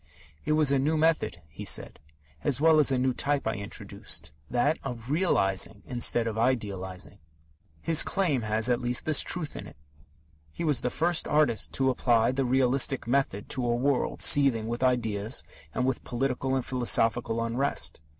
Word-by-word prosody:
"It 155 - +1
was 155 -2 +3
a 140 - +2
new 155 +4 0
method," 155 - 0
he 75 - -10
said, - - 0 0.4
"as 140 -4 +1
well 160 0 +4
as 145 -2 +4
a 130 - +1
new 130 0 +1
type 145 +2 -1
I 110 - -1
introduced 100 -6 -5 0.2
that 145 +6 0
of 120 -1 -6
Realizing 105 - 0
instead 120 -1 +1
of 110 -1 -3
Idealizing." 100 -5 -3 0.6
His 165 -2 +4
claim 165 -10 0
has, 110 +1 +1
at 120 -1 +1
least, 120 0 +1
this 155 -2 +4
truth 170 -4 -3
in - - -8
it: - - -15 0.7
he 170 - -6
was 150 -6 +1
the 125 - -1
first 170 +5 0
artist 150 -7 +1
to 135 -1 +1
apply 120 -2 +2
the 135 +1 -1
realistic 130 +1 +2
method 120 -5 -1
to 130 - -2
a 120 -1 0
world 130 +2 0
seething 130 -6 +4
with 120 +1 -4
ideas 115 -3 0 0.3
and 125 - -2
with 130 -1 -2
political 130 +1 -2
and 130 - -2
philosophical 115 -2 +1
unrest. 125 - -2
125 Hz, 170 wpm, -27 LUFS, 115-140 Hz, 0.7 s, well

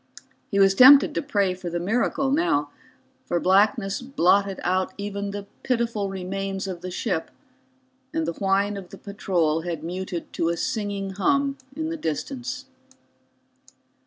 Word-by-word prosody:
He 200 - -1
was 195 -1 +6
tempted 275 +7 +8
to - - -1
pray 200 -10 +1
for 180 -1 -6
the 170 0 -2
miracle 245 +8 0
now, 150 - +1 0.6
for 175 - +1
blackness 195 +3 +2
blotted 200 -6 +2
out 185 +1 0
even 200 0 -4
the 200 0 -6 0.2
pitiful 235 -5 -1
remains 195 +1 -4
of 180 -2 -5
the 185 - -5
ship, 180 -2 -2 0.8
and 160 - -1
the 170 - -2
whine 200 +2 +1
of 185 -2 -9
the - - -11
patrol 175 -6 0
had 165 -2 -5
muted 180 0 -5
to 165 - 0
a 170 - -1
singing 205 -5 -2
hum 275 +8 +1 0.2
in 315 0 -3
the 330 - -3
distance. 250 - -4
195 Hz, 150 wpm, -24 LUFS, 180-230 Hz, 0.8 s, tempted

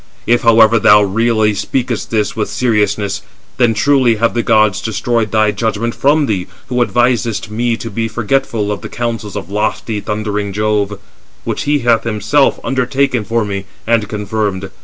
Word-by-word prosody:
If, 120 +1 +2
however, 115 -1 +5
thou 105 0 +6
really 110 +1 +1
speakest 120 +3 -2
this 105 -2 -1
with 110 -2 -2
seriousness, 105 -4 0 0.4
then 120 -3 +2
truly 130 -1 +3
have 115 +2 +1
the 120 - 0
gods 110 -4 +2
destroyed 110 +1 -1
thy 110 -1 +3
judgment 110 +2 -2
from 145 +2 +2
thee, 95 -7 -2 0.2
who 125 -1 0
advisest 120 -3 0
me 115 +1 0
to 115 -1 -7
be 115 +2 -2
forgetful 115 -1 -1
of 105 - -4
the - - -7
counsels 115 -4 -4
of 100 -1 -6
lofty 105 +1 -2
thundering 105 -1 -3
Jove, 105 -1 0 0.5
which - - -3
he 145 -1 +1
hath 115 -1 +3
himself 115 +6 +1
undertaken 130 -2 0
for 115 +2 -1
me, 100 -1 -4 0.2
and 115 -3 +1
confirmed. 105 -2 -3
110 Hz, 160 wpm, -15 LUFS, 105-120 Hz, 0.5 s, thou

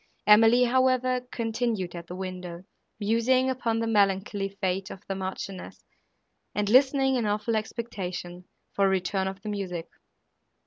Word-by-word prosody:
Emily, 225 +3 +7
however, 255 0 +2
continued 225 -5 -2
at 170 -1 -8
the 180 - -7
window, 180 -2 -6 0.4
musing 235 +5 +2
upon 240 -3 -1
the 230 - 0
melancholy 200 -2 +1
fate 190 -1 -2
of 190 - -10
the 195 - -2
Marchioness 190 0 -6 0.7
and 210 -1 0
listening, 265 +1 +4
in 230 -3 0
awful 210 +2 0
expectation, 185 -5 -5 0.3
for 200 -1 +3
a - - +3
return 190 0 0
of 195 +1 -6
the 215 - -4
music. 185 -5 -4
205 Hz, 140 wpm, -27 LUFS, 190-235 Hz, 0.7 s, Emily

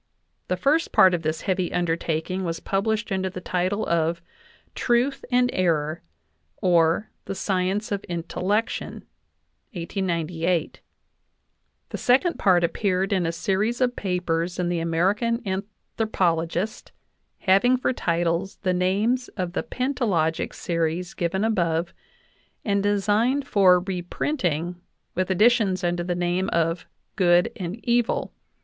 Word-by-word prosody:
The - - -1
first 305 +4 +2
part 185 -1 +6
of 175 - 0
this 155 0 -2
heavy 185 -2 -1
undertaking 170 +1 -1
was 165 -1 -3
published 220 +3 -1
under 190 -1 0
the 185 - -7
title 185 +4 -1
of 170 0 +1 0.5
"Truth 245 +3 +1
and 245 0 +3
Error; 160 -3 0 0.6
or, 170 +2 +2
the 195 - -4
science 190 +2 -1
of 200 -1 -2
intellection" 180 +5 -2 0.7
(1898); 170 -2 -2 1.1
the - - -4
second 275 +8 +2
part 180 -3 +4
appeared 190 +2 0
in 180 -3 +1
a - - 0
series 200 +7 -1
of 250 -1 +1
papers 180 -2 -1
in 180 -1 0
the 175 -1 0
American 195 +8 +1
An 190 +1 -2 0.3
thropologist, 180 -1 0 0.5
having 205 +7 +4
for 255 - 0
titles 170 -1 -1
the 185 -2 +2
names 205 +8 +1
of 180 -2 -2
the - - 0
pentalogic 235 - -1
scries 170 +1 -2
given 180 +3 -1
above, 170 -6 0 0.7
and 200 -2 +1
designed 210 +7 +1
for 185 -5 +5
reprinting 180 - -2 0.3
with 185 +1 -1
additions 200 -1 +3
under 175 0 0
the 175 0 -2
name 175 +2 0
of 165 +1 0 0.3
"Good 175 -2 +4
and 180 0 -4
Evil." 240 -1 +1
185 Hz, 125 wpm, -24 LUFS, 170-210 Hz, 1.1 s, part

